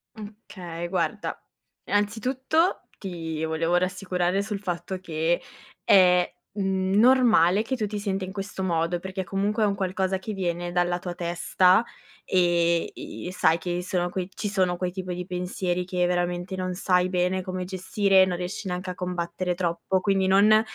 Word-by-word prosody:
Okay, 190 -5 -8
guarda: 180 +3 -2 0.5
innanzitutto 255 - +1 0.2
ti 165 -5 -5
volevo 165 +2 0
rassicurare 180 +1 0
sul 200 -1 -4
fatto 180 0 -4
che 165 -1 0 0.4
è, 180 -2 +5 0.2
mhmm, 190 -1 0
normale 225 -7 +5
che 245 +4 -2
tu 220 -4 -1
ti 205 0 -4
senta 195 -2 -2
in 185 - -7
questo 195 -1 -5
modo, 170 -1 0
perché 190 +1 -4
comunque 200 +4 -1
è 210 - +4
un 200 - 0
qualcosa 190 0 -1
che 215 +3 -6
viene 175 -2 -2
dalla 175 0 +1
tua 175 0 -5
testa, 180 +3 +3 0.5
e 170 -2 +2
i - - -7
e 180 - -4
sai 165 -2 +3
che 175 +1 -3
sono 180 -1 -1
quei 180 0 -3
ci 205 - -3
sono 185 -3 +1
quei 180 0 -2
tipo 185 -1 -5
di 180 0 -5
pensieri 180 0 -2
che, 180 -1 0
veramente, 175 +1 -1
non 185 0 -2
sai 180 -1 +2
bene 180 +1 0
come 185 0 -4
gestire, 190 +1 +3
non 180 -1 -2
riesci 180 +3 -5
neanche 180 +1 -3
a 180 - -4
combattere 180 0 -2
troppo, 175 +1 -1
quindi 195 -1 +2
non 210 +3 +6
185 Hz, 165 wpm, -25 LUFS, 175-195 Hz, 0.5 s, non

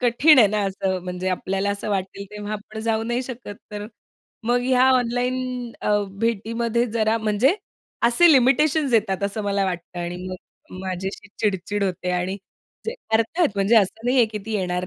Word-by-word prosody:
कठीण 255 +5 +5
आहे 215 - +8
ना. 210 0 0
असं 190 -1 -1
म्हणजे 180 +1 -3
आपल्याला 195 +2 -1
असं 200 +1 -3
वाटेल 195 0 -3
तेव्हा 210 0 -6
आपण 215 +1 -6
जाऊ 225 0 0
नाही 240 +2 -1
शकत. 245 -5 -7 0.2
तर 210 0 -5 0.6
मग 245 +1 +3
ह्या 255 0 +4
ऑनलाईन 250 0 -2
अ, - - -2 0.3
भेटीमध्ये 230 +1 0
जरा 225 0 +2
म्हणजे 220 - +2 0.5
असे 320 +8 +6
लिमिटेशन्स 275 +2 +3
येतात 200 -4 +2
असं 205 +2 -2
मला 200 -1 0
वाटतं 175 -1 -4
आणि 175 +1 -4
मग 185 - -5 0.4
माझी 190 0 -4
अशी 205 +1 -10
चिड-चिड 205 0 -1
होते 180 -1 -2
आणि 180 +1 -1 0.5
म्हणजे 455 - -2 0.2
अर्थात 320 +10 +1
म्हणजे 200 +4 +3
असं 220 +3 +2
नाहीये 250 -1 +5
की 215 -1 -5
ती 225 - -4
येणार 180 -2 -1
215 Hz, 170 wpm, -23 LUFS, 195-245 Hz, 0.6 s, आहे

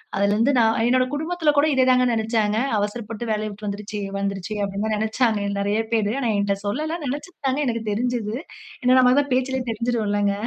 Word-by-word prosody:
அதுலருந்து 205 +6 +2
நான் 225 -1 +3
என்னுடைய 255 +1 +3
குடும்பத்ல 315 +1 0
கூட 285 - +5
இதே 260 -1 +3
தாங்க 255 0 +4
நெனச்சாங்க. 220 -1 0 0.2
"அவசரப்பட்டு 210 +2 -3
வேலைய 215 0 -1
விட்டு 205 +1 -9
வந்துருச்சு 205 +1 -5 0.2
வந்துருச்சு" 200 0 -3
அப்டின்னு 200 +1 -2
தான் 215 -1 0
நெனச்சாங்க 220 0 +1 0.2
நெறைய 205 +2 0
பேரு. 215 -2 +2
ஆனா 255 - -1
என்ட்ட 200 0 +1
சொல்லல. 310 +11 -2
நெனச்சுருந்தாங்க, 285 0 -3
எனக்குத் 230 -3 -2
தெரிஞ்சது. 230 0 -1 0.5
என்ன 250 +1 +5
நமக்கு 255 +2 +5
தான் 285 - -6
பேச்சுலயே 260 0 0
தெரிஞ்சுருல்லங்க. 210 -3 0
225 Hz, 165 wpm, -23 LUFS, 205-255 Hz, 0.5 s, கூட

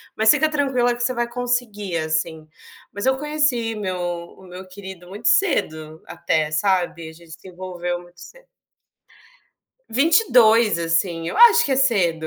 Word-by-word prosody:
mas 220 0 +2
fica 300 +4 +4
tranquila 265 -5 0
que 240 - -9
você 255 +1 0
vai 240 -1 -2
conseguir", 240 -7 -3
assim. 160 0 -3 0.5
Mas 205 - -5
eu 265 - +2
conheci 290 -6 -1
meu 190 -3 -4
o 175 +1 -6
meu 185 0 -11
querido 185 -2 -11
muito 210 +4 -5
cedo, 155 - 0
até, 155 -2 -2
sabe. 175 -1 -1
A - - -13
gente 165 0 -18
se 175 - -13
envolveu 175 -1 -5
muito 175 0 -19
cedo. - - -15 1.5
22, 235 - +3
assim, 165 0 -1
eu - - -5
acho 470 0 +7
que 275 - -1
é - - +1
cedo. 185 -12 +1
195 Hz, 155 wpm, -21 LUFS, 170-245 Hz, 1.5 s, acho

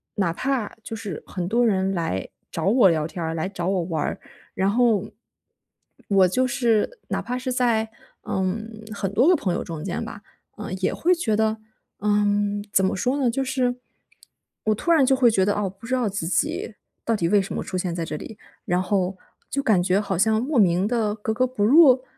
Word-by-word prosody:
哪 190 -5 0
怕 260 +1 -1 0.2
就 225 - -6
是 210 -7 -6
很 180 -2 -4
多 235 +5 +2
人 195 -4 +1
来 165 - -2 0.2
找 - - -3
我 210 -2 +5
聊 155 -2 +1
天 165 +1 -5
儿、 160 0 -2
来 160 +3 -2
找 180 -2 -4
我 190 -2 +1
玩 165 -3 -2
儿， - - -3 0.4
然 190 +1 +1
后 230 -2 +2 1.0
我 195 -2 +5
就 255 +8 +1
是 255 - +1
哪 - - -1
怕 250 +1 -3
是 255 0 -3
在， 235 -3 +1 0.4
嗯， 205 +2 -1 0.2
很 200 -2 -3
多 240 +8 +4
个 360 - +6
朋 195 - -1
友 - - -2
中 160 -3 -6
间 - - -3
吧， - - -8 0.3
嗯， 185 - -5
也 - - +1
会 360 +2 +2
觉 295 -12 0
得， 220 0 +1 0.4
嗯， 205 0 +1
怎 190 - +4
么 190 - +1
说 255 +8 0
呢， 260 -3 +2
就 270 +3 -1
是 255 -2 0 0.9
我 215 - +2
突 340 - -1
然 310 -5 +5
就 265 +1 +4
会 250 -2 +5
觉 190 -4 +2
得， 205 - +2
哦， 205 -1 -1
不 195 +5 -14
知 250 - -3
道 245 -5 +1
自 195 -4 -4
己 200 +4 -1 0.3
到 230 - +1
底 170 -5 0
为 205 +4 +4
什 195 - -3
么 - - -3
出 185 - -4
现 180 -1 -2
在 170 -1 -3
这 155 -2 -4
里， 215 - -10 0.3
然 180 +1 +1
后 185 0 0 0.3
就 275 - -2
感 210 -8 +3
觉 185 +2 +2
好 195 -3 -2
像 220 +3 +3
莫 265 0 +1
名 180 -1 +3
地 220 -3 0
格 220 +1 -3
格 255 +3 +2
不 245 -5 -2
入？ 265 -1 +6
210 Hz, 230 characters per minute, -23 LUFS, 185-245 Hz, 1.0 s, 个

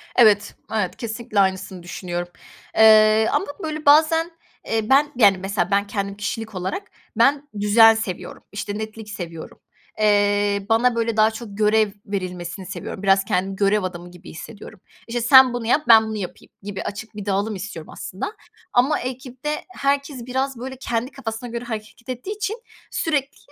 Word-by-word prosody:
Evet, 215 -3 +4 0.2
evet, 200 -5 -1
kesinlikle 225 -2 -3
aynısını 190 -2 0
düşünüyorum, 175 0 -5 0.5
eee, 220 0 +6
ama - - +1 0.2
böyle 310 -1 -4
bazen, 320 +3 +5 0.4
eee, 220 -1 -1
ben, 285 +2 +4
yani, 205 -5 +5
mesela, 195 +3 -2
ben 200 +1 +2
kendim 200 -1 -3
kişilik 220 +1 -4
olarak 185 - -4 0.3
ben 280 +5 +3
düzen 225 +2 +7
seviyorum, 210 -5 -5
işte, 205 0 -4
netlik 220 0 -7
seviyorum, 170 -5 -8 0.4
eee, 205 -1 +2
bana 235 +2 +3
böyle 230 -1 -1
daha 215 +1 +5
çok 230 +1 -8
görev 215 0 +3
verilmesini 185 -2 -5
seviyorum, 185 +1 -7
biraz 195 0 +4
kendimi 195 +1 -1
görev 200 +1 +2
adamı 175 -1 -6
gibi 175 -1 -13
hissediyorum. 210 +3 -10 0.3
"İşte, 240 +1 -2
sen 260 +1 +7
bunu 240 -2 -4
yap, 295 +5 +3
ben 225 -2 +8
bunu 220 0 -4
yapayım," 190 -4 -8
gibi 200 -1 -5
açık 215 +2 -7
bir 205 -2 -6
dağılım 205 +2 -1
istiyorum, 185 -4 -7
aslında, 195 - -6 0.4
ama 260 +5 +3
ekipte 255 +3 -4
herkes 280 -6 -2
biraz 260 +1 -2
böyle 260 +2 -6
kendi 240 0 -2
kafasına 225 0 -6
göre 235 +1 -5
hareket 225 +2 -8
ettiği 255 - -5
için 425 +2 -4 0.3
sürekli, 285 -4 -1
220 Hz, 160 wpm, -22 LUFS, 200-250 Hz, 0.5 s, ben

